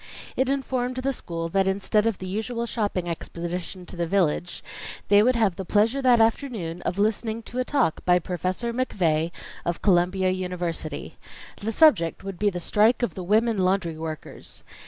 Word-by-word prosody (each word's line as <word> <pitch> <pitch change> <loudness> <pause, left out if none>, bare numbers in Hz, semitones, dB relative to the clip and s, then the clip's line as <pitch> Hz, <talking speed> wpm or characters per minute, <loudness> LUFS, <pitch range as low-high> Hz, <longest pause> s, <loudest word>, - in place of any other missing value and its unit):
It 260 0 +1
informed 260 -2 -1
the 265 +1 -1
school 165 -7 -4
that 195 +2 +2
instead 200 +3 +2
of 225 -4 0
the 185 - -7
usual 225 +5 -2
shopping 205 -6 -2
expedition 175 +2 -5
to - - -10
the 170 -1 -1
village, 175 -2 0 0.5
they 205 0 +7
would 250 +3 +3
have 215 -6 +2
the 190 - -3
pleasure 220 +8 +2
that 250 -3 +5
afternoon 225 -7 0
of 180 - -2
listening 220 +2 0
to 245 - -5
a - - +2
talk 250 - 0
by 180 0 +5
Professor 185 +6 -2
McVey 170 -10 +1 0.3
of 170 0 -3
Columbia 185 0 +3
University. 180 -4 -4 0.4
The 220 +2 -3
subject 215 - +4
would 195 -2 -6
be 210 - +3
the 180 -3 -4
strike 215 +8 +3
of 240 - 0
the 190 - -6
women 220 +3 +2
laundry 185 -3 +1
workers. 155 -1 -6
195 Hz, 175 wpm, -25 LUFS, 175-230 Hz, 0.5 s, they